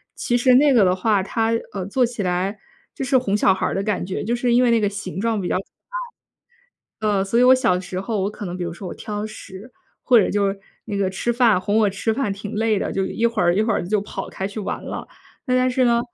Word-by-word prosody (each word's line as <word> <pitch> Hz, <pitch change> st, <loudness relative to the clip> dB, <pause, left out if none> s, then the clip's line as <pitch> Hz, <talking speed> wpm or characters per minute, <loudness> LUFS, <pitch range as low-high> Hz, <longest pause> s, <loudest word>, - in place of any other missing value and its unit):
其 240 Hz, -, -1 dB
实 250 Hz, +1 st, +4 dB
那 285 Hz, +2 st, +5 dB
个 230 Hz, -5 st, +5 dB
的 180 Hz, -1 st, +3 dB
话， 200 Hz, +1 st, +1 dB
她 225 Hz, +3 st, -1 dB, 0.2 s
呃， 190 Hz, -2 st, -4 dB
做 250 Hz, +7 st, +1 dB
起 235 Hz, -3 st, -1 dB
来 185 Hz, +3 st, -1 dB, 0.4 s
就 270 Hz, -, -3 dB
是 270 Hz, +1 st, +1 dB
哄 210 Hz, -5 st, 0 dB
小 195 Hz, -, +4 dB
孩 190 Hz, -, -1 dB
儿 -, -, -3 dB
的 195 Hz, -, -1 dB
感 210 Hz, -3 st, -1 dB
觉， 185 Hz, +1 st, -4 dB
就 235 Hz, +4 st, 0 dB
是 240 Hz, 0 st, 0 dB
因 250 Hz, -, +5 dB
为 240 Hz, -, +3 dB
那 230 Hz, -, +4 dB
个 205 Hz, -, +2 dB
形 200 Hz, -4 st, -6 dB
状 225 Hz, -1 st, 0 dB
比 185 Hz, -, -3 dB
较 -, -, 0 dB
可 -, -, -7 dB, 1.4 s
爱。 215 Hz, -, 0 dB
呃， 200 Hz, -2 st, +2 dB
所 215 Hz, +4 st, 0 dB
以 -, -, +5 dB
我 250 Hz, +1 st, +7 dB
小 185 Hz, -8 st, +2 dB
时 185 Hz, 0 st, -5 dB
候 205 Hz, +1 st, -2 dB
我 195 Hz, -, -1 dB
可 210 Hz, -1 st, -7 dB
能 175 Hz, 0 st, -5 dB
比 180 Hz, -, -5 dB
如 170 Hz, -1 st, -3 dB
说 180 Hz, +3 st, -8 dB
我 -, -, -6 dB
挑 210 Hz, 0 st, -5 dB
食， 215 Hz, +1 st, -11 dB, 0.3 s
或 245 Hz, -2 st, +6 dB
者 -, -, +1 dB
就 205 Hz, -1 st, +1 dB
是 195 Hz, 0 st, -4 dB, 0.2 s
那 210 Hz, -2 st, -4 dB
个 195 Hz, -1 st, 0 dB
吃 215 Hz, +5 st, -1 dB
饭 235 Hz, -5 st, +3 dB
哄 205 Hz, +2 st, 0 dB
我 210 Hz, -2 st, +3 dB
吃 210 Hz, +3 st, -1 dB
饭 235 Hz, -6 st, -1 dB
挺 200 Hz, +1 st, -7 dB
累 220 Hz, -1 st, +1 dB
的， -, -, -3 dB
就 195 Hz, -, 0 dB
一 230 Hz, +4 st, 0 dB
会 230 Hz, -4 st, 0 dB
儿 175 Hz, 0 st, +3 dB
一 -, -, +3 dB
会 220 Hz, +1 st, +1 dB
儿 190 Hz, -, -1 dB
就 210 Hz, +2 st, +1 dB
跑 195 Hz, -1 st, -6 dB
开 190 Hz, -, -4 dB
去 205 Hz, +2 st, -6 dB
玩 200 Hz, -, -4 dB
了。 -, -, -6 dB, 0.4 s
那 255 Hz, -1 st, +2 dB
但 255 Hz, 0 st, +3 dB
是 255 Hz, 0 st, +2 dB
呢， 235 Hz, -1 st, +3 dB
210 Hz, 300 characters per minute, -22 LUFS, 195-235 Hz, 1.4 s, 我